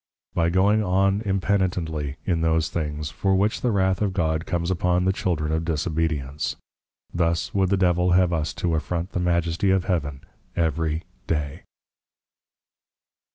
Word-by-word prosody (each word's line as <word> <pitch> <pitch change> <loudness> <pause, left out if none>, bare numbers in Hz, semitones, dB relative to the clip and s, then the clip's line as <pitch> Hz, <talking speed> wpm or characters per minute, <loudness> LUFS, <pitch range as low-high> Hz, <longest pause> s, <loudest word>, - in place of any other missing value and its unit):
By 85 0 +2
going 100 +5 +3
on 95 +2 +2
impenitently 90 -7 0
in 85 -3 +1
those 80 -1 +2
things, 75 -2 -3
for 95 +5 +1
which 100 +3 +1
the 125 - +1
Wrath 95 -3 +1
of 100 -3 +1
God 80 -2 0
comes 85 0 -1
upon 90 0 +1
the 95 - +3
Children 80 -5 -1
of 80 +1 0
Disobedience. 75 -3 -1 0.6
Thus 85 -1 0
would 95 -2 +2
the 100 - +2
Devil 90 -1 +3
have 90 -1 +4
us 80 -2 -1
to 85 -2 -1
affront 85 +3 -2
the - - -2
Majesty 85 +1 +1
of 95 -1 +2
Heaven 75 -7 -1 0.3
every 80 0 0 0.2
day. 75 -3 -2
85 Hz, 150 wpm, -24 LUFS, 80-95 Hz, 0.6 s, have